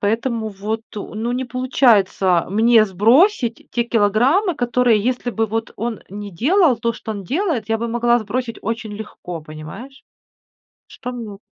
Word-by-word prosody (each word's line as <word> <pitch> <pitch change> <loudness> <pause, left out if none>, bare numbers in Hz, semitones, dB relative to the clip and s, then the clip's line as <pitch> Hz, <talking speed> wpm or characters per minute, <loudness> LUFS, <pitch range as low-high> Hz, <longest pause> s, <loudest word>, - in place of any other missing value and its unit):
...поэтому 225 +2 -1
вот, 210 +2 -4 0.2
ну 215 +3 -4
не 255 +1 -2
получается 235 -8 +2
мне 225 +2 +5
сбросить 230 - +2
те 235 -1 0
килограммы, 240 - +2
которые 245 -2 +2
если 245 +2 -1
бы 225 -1 0
вот 225 +1 -3
он 230 -2 -3
не 205 +1 -7
делал 295 - +3
то, 230 +1 -1
что 225 -1 -6
он 200 -2 -6
делает, 280 - -1
я 225 0 +1
бы 235 - -2
могла 240 +1 +2
сбросить 230 +2 -3
очень 225 0 -4
легко, 190 -5 -7
понимаешь? 155 - -10 0.9
Что 250 - -7
мне 225 -5 -7
230 Hz, 150 wpm, -20 LUFS, 210-250 Hz, 0.9 s, мне